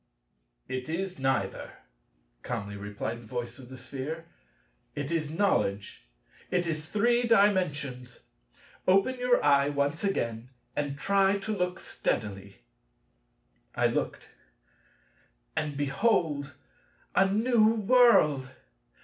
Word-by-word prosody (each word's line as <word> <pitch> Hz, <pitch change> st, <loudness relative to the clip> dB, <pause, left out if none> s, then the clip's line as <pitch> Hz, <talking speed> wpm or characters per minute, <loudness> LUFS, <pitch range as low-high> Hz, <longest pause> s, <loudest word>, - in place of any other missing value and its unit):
"It 130 Hz, +2 st, -4 dB
is 185 Hz, +2 st, -3 dB
neither," 135 Hz, -1 st, -1 dB, 0.7 s
calmly 100 Hz, -4 st, -4 dB
replied 105 Hz, +3 st, -5 dB
the 115 Hz, -, -14 dB
voice 120 Hz, +1 st, -5 dB
of 125 Hz, -2 st, -12 dB
the 130 Hz, -, -9 dB
Sphere, 140 Hz, +6 st, -6 dB, 0.7 s
"it 145 Hz, +1 st, -4 dB
is 160 Hz, -3 st, -1 dB
Knowledge; 125 Hz, -, -1 dB, 0.4 s
it 180 Hz, -1 st, +1 dB
is 155 Hz, -2 st, -3 dB
Three 240 Hz, +3 st, +2 dB
Dimensions: 150 Hz, -, +1 dB, 0.7 s
open 195 Hz, +8 st, +3 dB
your 250 Hz, 0 st, +2 dB
eye 140 Hz, -1 st, +4 dB
once 145 Hz, +3 st, -1 dB
again 120 Hz, -, -2 dB, 0.3 s
and 145 Hz, -1 st, -2 dB
try 195 Hz, +3 st, +3 dB
to 215 Hz, +2 st, -3 dB
look 180 Hz, -1 st, -1 dB
steadily." 100 Hz, -, -4 dB, 1.1 s
I -, -, +1 dB
looked, -, -, -1 dB, 1.3 s
and, 150 Hz, -3 st, -2 dB
behold, 145 Hz, -, 0 dB, 0.6 s
a 195 Hz, 0 st, +4 dB
new 225 Hz, +2 st, +3 dB
world! 210 Hz, -, +4 dB
150 Hz, 105 wpm, -28 LUFS, 130-195 Hz, 1.3 s, eye